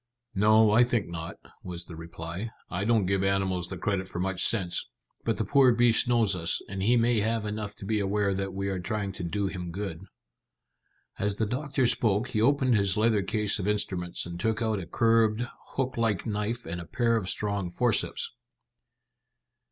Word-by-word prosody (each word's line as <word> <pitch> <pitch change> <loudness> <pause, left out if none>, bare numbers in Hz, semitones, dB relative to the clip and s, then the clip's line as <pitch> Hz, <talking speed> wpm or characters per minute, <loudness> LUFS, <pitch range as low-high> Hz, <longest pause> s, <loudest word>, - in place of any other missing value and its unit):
"No, 110 +1 +5
I 115 +3 +6
think 120 -6 0
not," 80 -1 -6 0.3
was 85 -1 -6
the 85 - -10
reply. 85 +5 -6 0.2
"I 95 +2 -2
don't 110 -3 +3
give 95 +1 +1
animals 95 -2 0
the 95 - -6
credit 95 +1 -1
for 95 - -8
much 95 0 0
sense, 95 -6 +1 0.4
but - - 0
the - - -1
poor 135 -3 +5
beast 120 -1 +4
knows 115 -5 +3
us, 85 -1 +1
and 95 0 -5
he 120 +5 +3
may 115 -1 +3
have 110 +1 0
enough 105 -1 -4
to - - -9
be 110 +1 0
aware 100 0 +1
that 95 0 -2
we 100 +1 -3
are 95 -1 -2
trying 100 +2 -3
to 95 - -7
do 100 +4 -1
him 90 -2 -4
good." 95 -3 -5 1.2
As 100 0 0
the 110 - 0
doctor 135 +3 -1
spoke 115 0 +2
he 110 -4 0
opened 130 +1 +3
his 100 -2 +2
leather 110 -1 +3
case 105 +1 0
of 100 - -2
instruments, 95 -4 -1
and 85 0 -7
took 110 +3 0
out 110 -3 0
a 85 - -7
curved, 115 +1 +2 0.3
hook 130 -2 -1
like 110 -5 0
knife 110 +2 -2
and 85 +2 -4
a - - -8
pair 115 +5 +1
of 100 -5 -1
strong 100 -3 -2
forceps. 115 +6 0
105 Hz, 190 wpm, -28 LUFS, 95-115 Hz, 1.2 s, I